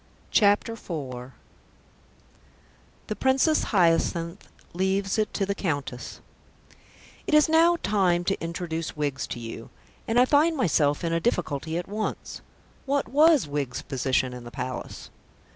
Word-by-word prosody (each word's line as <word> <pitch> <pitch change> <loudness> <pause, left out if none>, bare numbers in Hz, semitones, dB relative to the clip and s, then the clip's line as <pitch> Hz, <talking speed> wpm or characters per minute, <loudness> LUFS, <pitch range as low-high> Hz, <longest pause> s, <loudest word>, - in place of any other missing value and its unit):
CHAPTER 205 +1 +3
IV 135 - -7 1.7
THE 215 - -4
PRINCESS 265 +6 +2
HYACINTH 170 -1 +1 0.3
LEAVES 190 +3 0
IT 215 - 0
TO 195 - -1
THE 200 - -1
COUNTESS 145 -10 -4 1.1
It 305 - +3
is 300 - +6
now 330 +2 +4
time 185 -4 +2
to 195 -1 -2
introduce 165 -2 -4
Wiggs 145 -3 -2
to 120 - -6
you, 115 0 -8 0.4
and 225 +2 +2
I 250 - +6
find 310 +4 +3
myself 150 - +2
in 165 -1 -1
a 165 - +2
difficulty 160 - -1
at 175 - -4
once. 215 +2 -4 0.5
What 280 -3 0
was 300 - +5
Wiggs's 140 -4 -3
position 130 -1 0
in 125 -1 -8
the 120 - -9
Palace? 125 +1 -6
175 Hz, 135 wpm, -26 LUFS, 145-225 Hz, 1.7 s, is